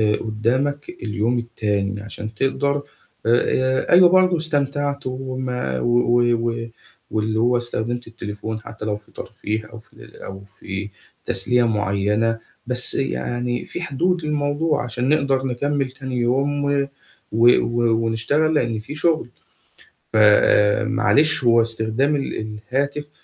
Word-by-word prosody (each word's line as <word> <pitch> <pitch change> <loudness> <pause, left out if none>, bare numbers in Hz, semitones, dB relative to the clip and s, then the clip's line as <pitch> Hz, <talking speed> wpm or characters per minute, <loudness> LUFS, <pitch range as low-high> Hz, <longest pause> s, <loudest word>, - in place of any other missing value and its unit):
قدامك 130 +9 -1
اليوم 115 +3 0
التاني 105 -3 -2
عشان 110 +1 -7
تقدر 140 +3 0 0.4
آآ 130 +3 +2
أيوة 180 0 +8
برضو 185 -1 +4
استمتعت 145 -3 -1
وما 130 - -3
و 120 - +3 0.3
و 115 0 -4 0.4
واللي 110 0 0
هو 120 +2 +3
استخدمت 120 0 -3
التليفون 110 -1 -6
حتى 110 -1 -8
لو 105 -1 -1
في 105 - -22
ترفيه 110 0 -5
أو 115 - -8
في 110 - -24
ال - - -15
أو 95 0 -8 0.2
في 100 +2 -5 0.4
تسلية 125 +5 +1
معينة، 105 +2 0 0.3
بس 125 0 -2
يعني 120 - -2
فيه - - -6
حدود 175 +3 0
للموضوع 150 +1 0
عشان 120 +2 -2
نقدر 140 -3 +2
نكمل 135 +2 -1
تاني 130 -1 -6
يوم 135 +4 +1
و 140 -1 +1 0.4
و 115 +2 +5
و 115 -1 +1
ونشتغل 140 +8 +1
لأن 115 -6 0
في 110 +8 -8
شغل. 155 -3 +1 0.8
فمعلش 110 +8 +4
هو 115 -1 +5
استخدام 115 +5 0
ال 140 - -3 0.3
الهاتف، 145 +2 -1
120 Hz, 125 wpm, -21 LUFS, 110-140 Hz, 0.8 s, أيوة